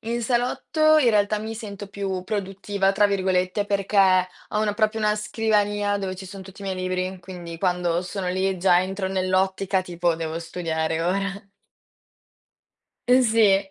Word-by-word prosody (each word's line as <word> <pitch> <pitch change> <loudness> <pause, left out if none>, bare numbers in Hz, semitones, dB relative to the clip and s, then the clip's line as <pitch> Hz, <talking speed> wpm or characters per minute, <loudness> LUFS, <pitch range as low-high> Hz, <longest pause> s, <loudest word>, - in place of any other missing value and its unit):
in 235 +2 -3
salotto, 265 +6 +2
in 265 -5 +4
realtà, 210 0 +2
mi 220 +1 -5
sento 205 -3 -7
"più 195 -2 -4
produttiva" 195 -1 -1
tra 205 +1 +4
virgolette, 190 0 0
perché 200 0 -2 0.5
ho 210 - -1
una 210 -1 0
proprio 215 0 +1
una 210 0 +2
scrivania, 205 -1 0
dove 190 -2 -4
ci 190 - -9
sono 190 +1 -9
tutti 195 +1 -13
i - - -7
miei 190 -1 -2
libri, 185 0 -2
quindi 175 -2 -8
quando 180 -2 0
sono 185 0 -4
lì, 190 0 0
già 180 -1 +4
entro 190 +1 -3
nell'ottica 190 0 0
tipo: 175 -2 -1
devo 165 0 -4
studiare 165 -1 -2
ora. 195 +3 -2 1.6
Uhm, 255 +1 +6
sì. 210 -5 +3
195 Hz, 160 wpm, -24 LUFS, 185-210 Hz, 1.6 s, Uhm